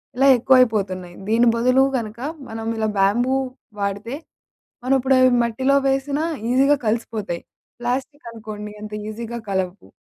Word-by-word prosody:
ఇలా 270 +2 +4
ఎక్కువైపోతున్నాయి. 205 -8 +2
దీని 230 +3 +3
బదులు 255 +3 +4
కనుక 225 -1 -6 0.3
మనం 225 0 -6
ఇలా 220 0 0
బ్యాంబూ 240 +7 +3 0.5
వాడితే 200 +5 -3 0.7
మనమిప్పుడవి 260 0 +4
మట్టిలో 260 +4 +1
వేసినా 275 +2 0 0.3
ఈజీగా 275 +3 +4
కలిసిపోతాయి. 215 -5 -2 0.4
ప్లాస్టికనుకోండి 230 -5 -5
అంత 210 0 -8 0.2
ఈజీగా 235 +2 -6
కలవ్వు. 190 0 -3
230 Hz, 110 wpm, -21 LUFS, 210-260 Hz, 0.7 s, ఇలా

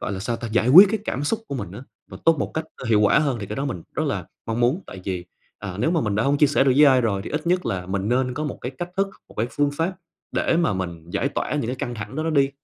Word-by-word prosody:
gọi - - -3
là 95 - -4
sao 115 +5 -2
ta, 120 - -6
giải 115 +2 +1
quyết 185 +9 +10
cái 220 - 0
cảm 140 -6 -2
xúc 225 +10 0
của - - -4
mình 105 -9 -5
á, 110 +5 -8 0.3
và - - -9
tốt 165 -2 +4
một - - -2
cách, 160 - -1
ơ, - - -9
hiệu 110 -2 +4
quả 105 +5 +5
hơn, 140 -5 0
thì 100 - -5
cái - - -5
đó 135 - -2
mình 125 - -4
rất - - 0
là - - -2 0.2
mong 115 +1 -2
muốn. 125 +9 +2
Tại 95 - -9
vì, 90 -2 -3 0.3
à, 95 -2 -6
nếu 125 +9 +1
mà 170 -2 +2
mình 105 -5 -1
đã 105 - +1
hông 140 +2 +2
chia 150 - +6
sẻ 140 -1 +2
được 135 - +4
với 150 - +8
ai 130 -2 +5
rồi 100 -5 0
thì - - -6
ít 150 +2 -3
nhất 180 +1 +1
là 90 -2 -2
mình 95 +2 -2
nên 125 +1 +1
có 150 +4 -3
một 145 - -4
cái 125 - -4
cách 175 0 -4
thức, 195 0 +1 0.2
một - - -16
cái 110 - 0
phương 145 0 +1
pháp 165 +6 -1 0.4
để - - +1
mà 170 -6 +2
mình 85 -3 -5
giải - - 0
tỏa - - -3
những 145 -6 -1
cái 125 +3 -3
căng 120 -1 -4
thẳng 105 +3 -7
đó 155 - -1
nó 165 - -1
đi. 140 -3 +3
130 Hz, 330 wpm, -23 LUFS, 105-150 Hz, 0.4 s, quyết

